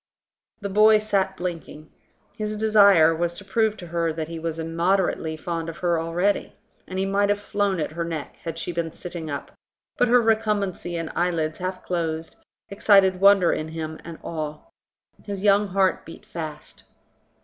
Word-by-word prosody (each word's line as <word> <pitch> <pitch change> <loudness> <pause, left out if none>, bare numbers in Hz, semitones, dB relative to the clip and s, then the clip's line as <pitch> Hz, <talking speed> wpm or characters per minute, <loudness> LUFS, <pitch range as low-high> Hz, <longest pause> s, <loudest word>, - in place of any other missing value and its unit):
The 200 - -3
boy 215 +2 +6
sat 195 -3 0
blinking. 165 -3 -6 0.4
His 215 0 -3
desire 200 -7 +6
was 170 +1 -1
to 200 - -10
prove 215 +1 +1
to 180 - -9
her 170 -1 -1
that 160 0 -4
lie 165 -1 -6
was 165 0 -3
immoderately 165 0 0
fond 165 0 -4
of 165 - -8
her 170 -2 +1
already; 175 +5 0 0.3
and 185 - -6
he 190 - 0
might 200 +1 +1
have 205 0 +2
flown 205 -2 -1
at 155 - -2
her 170 +2 -3
neck 165 -3 -5
had 165 -1 -6
she 165 - -3
been 170 -1 -3
sitting 170 -2 -7
up, 140 -1 -5 0.5
but 245 - +3
her 245 +1 +6
recumbency 210 -6 0
and 165 -1 -4
eyelids 165 -3 0
half 185 0 -4
closed 165 -2 -3 0.3
excited 195 -2 +4
wonder 195 -3 +6
in 155 - -3
him 160 0 -6
and 165 -1 -8
awe. 155 -2 -4 0.7
His 200 -2 -5
young 205 0 +4
heart 190 -1 +1
beat 165 - -12
fast. 155 -3 -8
175 Hz, 170 wpm, -24 LUFS, 165-200 Hz, 0.7 s, boy